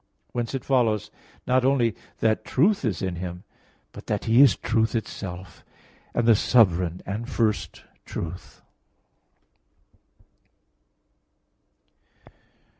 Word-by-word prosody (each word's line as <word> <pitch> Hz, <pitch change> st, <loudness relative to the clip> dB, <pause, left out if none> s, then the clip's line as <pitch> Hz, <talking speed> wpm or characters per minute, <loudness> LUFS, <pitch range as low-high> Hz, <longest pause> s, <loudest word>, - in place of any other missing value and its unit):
Whence 120 Hz, +1 st, -3 dB
it 130 Hz, -, -5 dB
follows 115 Hz, -6 st, +1 dB, 0.3 s
not 130 Hz, 0 st, +2 dB
only 125 Hz, -4 st, +2 dB, 0.3 s
that 110 Hz, -1 st, +2 dB
truth 190 Hz, +8 st, +2 dB
is 105 Hz, -8 st, -2 dB
in 90 Hz, -2 st, -2 dB
Him, 90 Hz, +1 st, -6 dB, 0.5 s
but -, -, -12 dB
that -, -, -2 dB
He 115 Hz, +4 st, +5 dB
is 140 Hz, -, +7 dB
truth 110 Hz, 0 st, 0 dB
itself, 95 Hz, -5 st, -6 dB, 0.5 s
and 120 Hz, -1 st, +1 dB
the 115 Hz, -, +8 dB
sovereign 90 Hz, -6 st, +2 dB
and 110 Hz, +6 st, -5 dB
first 110 Hz, -5 st, -1 dB, 0.2 s
truth. 85 Hz, +2 st, -7 dB
110 Hz, 105 wpm, -25 LUFS, 95-125 Hz, 0.5 s, the